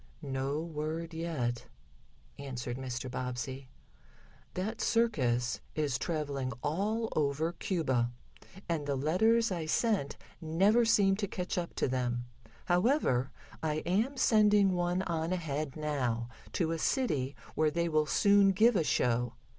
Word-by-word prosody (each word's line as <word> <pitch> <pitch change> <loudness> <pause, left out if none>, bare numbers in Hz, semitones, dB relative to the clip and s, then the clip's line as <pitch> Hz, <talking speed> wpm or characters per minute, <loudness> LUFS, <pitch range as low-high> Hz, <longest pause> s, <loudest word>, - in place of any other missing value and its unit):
"No 135 +2 -2
word 160 +1 -4
yet," 150 -8 -3 0.7
answered 125 -3 -5
Mr. 130 -1 -4
Bobbsey. 130 +1 -5 0.9
"That 215 +5 -3
circus 125 - +1 0.2
is 145 -5 0
traveling 140 -6 -2
all 210 +9 0
over 155 +2 +1
Cuba, 130 - 0 0.6
and 160 -4 -2
the 140 - 0
letters 220 - +2
I 165 -4 -3
sent 195 - 0 0.2
never 195 +9 +3
seem 200 -3 +4
to 205 -1 -2
catch 180 -1 -4
up 175 -1 -3
to - - +1
them. 125 -1 -1 0.4
However, 175 - +2 0.3
I 155 -1 -1
am 220 +10 +1
sending 210 -4 +4
one 175 +1 0
on 165 -1 -2
ahead 155 -5 -3
now, 125 -7 -1 0.2
to 165 -3 0
a 165 - -2
city 150 - 0 0.2
where 155 0 +2
they 170 +2 0
will 155 -2 +2
soon 200 +5 +5
give 225 +4 +4
a 170 - +3
show. 120 -3 +1
155 Hz, 130 wpm, -31 LUFS, 135-190 Hz, 0.9 s, soon